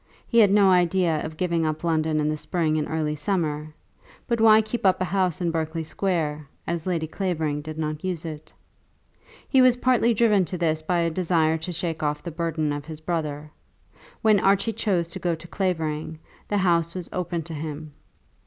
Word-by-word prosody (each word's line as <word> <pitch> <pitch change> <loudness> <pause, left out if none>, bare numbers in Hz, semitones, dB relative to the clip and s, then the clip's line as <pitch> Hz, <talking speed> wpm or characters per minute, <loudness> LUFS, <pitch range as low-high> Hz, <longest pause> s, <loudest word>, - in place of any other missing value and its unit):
He 235 - +3
had 210 -3 +7
no 200 -2 +5
idea 175 -3 +2
of 155 0 -6
giving 170 -2 0
up 155 0 -2
London 160 -2 +1
in 150 - +1
the 155 - 0
spring 155 0 -1
and 150 - -2
early 155 -1 -1
summer. 150 -2 -1 0.6
But 235 -2 0
why 220 -1 +7
keep 235 +2 -4
up 190 -2 +4
a - - +1
house 185 -1 0
in 170 -1 +1
Berkeley 160 0 -2
Square, 155 -4 -2 0.2
as 170 +1 -3
Lady 170 -3 0
Clavering 160 -4 -2
did 155 +1 -7
not 155 0 -3
use 180 -3 -3
it? 155 -2 -8 1.0
He 265 - +4
was 255 -1 +5
partly 245 -2 +3
driven 210 -3 +4
to 180 - -5
this 160 -2 0
by 170 +2 0
a 165 0 0
desire 160 -2 +1
to 160 +3 -5
shake 170 -2 -3
off 150 -1 -1
the 170 - -5
burden 160 -2 -1
of 145 0 -5
his 155 -1 -7
brother. 155 -3 -3 0.7
When 215 -2 +5
Archie 200 +4 +2
chose 190 -6 0
to - - -6
go 175 -2 0
to 160 +1 -12
Clavering 160 -5 -2 0.3
the 205 - 0
house 170 -3 +2
was 180 -2 -4
open 175 -2 -2
to 165 +1 -8
him. 155 0 -6
165 Hz, 195 wpm, -25 LUFS, 155-185 Hz, 1.0 s, had